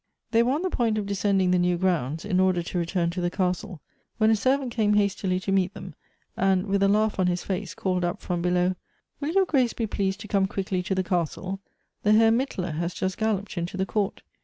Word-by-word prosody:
They 230 Hz, -1 st, +4 dB
were 245 Hz, +3 st, +2 dB
on 310 Hz, +5 st, -1 dB
the 370 Hz, -, -1 dB
point 225 Hz, -3 st, +1 dB
of 210 Hz, -, -1 dB
descending 195 Hz, -2 st, +1 dB
the 180 Hz, -, +3 dB
new 175 Hz, 0 st, +2 dB
grounds, 165 Hz, -4 st, 0 dB
in 185 Hz, -3 st, +1 dB
order 185 Hz, -2 st, +2 dB
to 175 Hz, -, -4 dB
return 170 Hz, 0 st, 0 dB
to 180 Hz, +1 st, -4 dB
the 175 Hz, -, +1 dB
castle, 180 Hz, -2 st, -2 dB, 0.4 s
when 220 Hz, -1 st, +4 dB
a -, -, +5 dB
servant 260 Hz, +3 st, +1 dB
came 215 Hz, -3 st, +2 dB
hastily 195 Hz, -2 st, +1 dB
to 195 Hz, -, -2 dB
meet 190 Hz, -1 st, +1 dB
them, 190 Hz, -2 st, -8 dB, 0.4 s
and, 190 Hz, 0 st, +2 dB
with 200 Hz, -1 st, 0 dB
a 195 Hz, -, +5 dB
laugh 210 Hz, +1 st, +2 dB
on 185 Hz, -, +3 dB
his 175 Hz, 0 st, -1 dB
face, 190 Hz, -2 st, -4 dB
called 185 Hz, -2 st, -1 dB
up 175 Hz, 0 st, -1 dB
from 175 Hz, -2 st, -3 dB
below, 180 Hz, +1 st, +2 dB, 0.2 s
" -, -, -47 dB
Will 290 Hz, +1 st, -2 dB
your 385 Hz, +3 st, +3 dB
grace 260 Hz, -8 st, +2 dB
be 230 Hz, -, -2 dB
pleased 195 Hz, -1 st, -2 dB
to 210 Hz, -, -8 dB
come 195 Hz, -2 st, +2 dB
quickly 190 Hz, -1 st, -2 dB
to 190 Hz, +1 st, -2 dB
the 185 Hz, -, +1 dB
castle? 180 Hz, +2 st, -2 dB, 0.4 s
The 210 Hz, -, +3 dB
Hen 225 Hz, +1 st, +5 dB
Mittler 190 Hz, -, -2 dB
has 170 Hz, +1 st, -2 dB
just 185 Hz, 0 st, -2 dB
galloped 205 Hz, -4 st, -1 dB
into 175 Hz, +2 st, -4 dB
the 190 Hz, -, 0 dB
court. 200 Hz, -1 st, -2 dB
190 Hz, 235 wpm, -26 LUFS, 180-215 Hz, 0.4 s, a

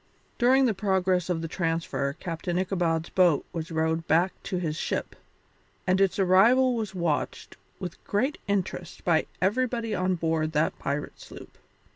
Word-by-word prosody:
During 260 Hz, +2 st, +5 dB
the 230 Hz, -, +2 dB
progress 185 Hz, -2 st, +1 dB
of 165 Hz, -2 st, -1 dB
the -, -, -2 dB
transfer 165 Hz, -5 st, -1 dB
Captain 170 Hz, +2 st, -4 dB
Ichabod's 175 Hz, -3 st, 0 dB
boat 175 Hz, -6 st, +3 dB
was 165 Hz, -1 st, -4 dB
rowed 160 Hz, 0 st, -1 dB
back 175 Hz, +4 st, +3 dB
to 195 Hz, -2 st, -2 dB
his 160 Hz, -4 st, -2 dB
ship, -, -, -3 dB, 0.7 s
and 185 Hz, +1 st, +2 dB
its 195 Hz, -2 st, +2 dB
arrival 225 Hz, +8 st, +5 dB
was 215 Hz, -4 st, -4 dB
watched 170 Hz, -4 st, -2 dB, 0.2 s
with 180 Hz, -3 st, -7 dB
great 260 Hz, +9 st, 0 dB
interest 185 Hz, -3 st, -3 dB
by 165 Hz, -3 st, +2 dB, 0.2 s
everybody 235 Hz, +2 st, 0 dB
on 185 Hz, -1 st, +1 dB
board 160 Hz, -2 st, -1 dB
that 150 Hz, +1 st, 0 dB
pirate 145 Hz, +1 st, -3 dB
sloop. -, -, -12 dB
180 Hz, 150 wpm, -27 LUFS, 165-195 Hz, 0.7 s, During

